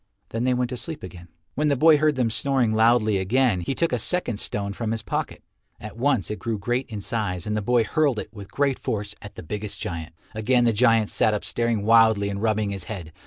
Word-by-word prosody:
Then 115 +2 -2
they 130 - +2
went 125 -1 -1
to 125 - -5
sleep 145 +6 -7
again. 90 -1 -10 0.3
When 150 +3 0
the 145 - +3
boy 155 +3 +6
heard 155 -1 +2
them 125 -3 0
snoring 130 -2 +1
loudly 110 -2 +3
again, 110 0 +2
he 135 +10 -3
took 165 -2 0
a 125 - +1
second 120 - -1
stone 100 -2 -2
from 115 +1 -4
his 115 -1 -2
pocket. - - -4 0.4
At 105 +1 -9
once 120 - 0
it 105 - -4
grew 115 -2 -2
great 120 +6 -2
in 105 -3 -5
size 95 -5 -3
and 105 - -2
the 105 - -1
boy 120 +3 +2
hurled 145 +1 +1
it 105 - -6
with 100 -3 -10
great 140 -2 0
force 105 -1 -3
at 105 - -11
the - - -9
biggest 105 +5 -5
giant. 80 -2 -5 0.2
Again 120 +3 +2
the 115 - +3
giant 115 -1 +3
sat 110 - +2
up 105 - -4
staring 115 -3 0
wildly 110 -2 +5
and 100 0 -4
rubbing 110 -2 0
his 100 -1 -6
head. 85 -7 -7
110 Hz, 235 wpm, -24 LUFS, 105-125 Hz, 0.4 s, boy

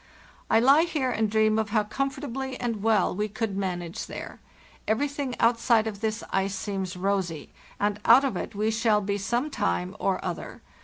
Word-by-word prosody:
I 225 - +5
lie 275 +6 +6
here 300 -7 0
and 220 -2 0
dream 215 0 +3
of 215 -1 -1
how 215 0 +2
comfortably 265 +2 -3
and 230 -4 -2
well 215 -4 +2
we 210 +2 -1
could 220 -1 -3
manage 180 -3 -3
there. - - -8 0.5
Everything 275 +3 -1
outside 230 -1 +3
of 210 -2 -5
this 220 0 -2
ice 195 0 0
seems 190 -1 -4
rosy, 185 -4 -2 0.3
and 205 0 0
out 255 +5 +7
of 260 - -1
it 180 - -5
we 215 +2 +1
shall 220 -1 +2
be 200 0 -2
some 240 +9 -1
time 90 - -1
or - - +1
other. - - -5
220 Hz, 175 wpm, -26 LUFS, 200-245 Hz, 0.5 s, out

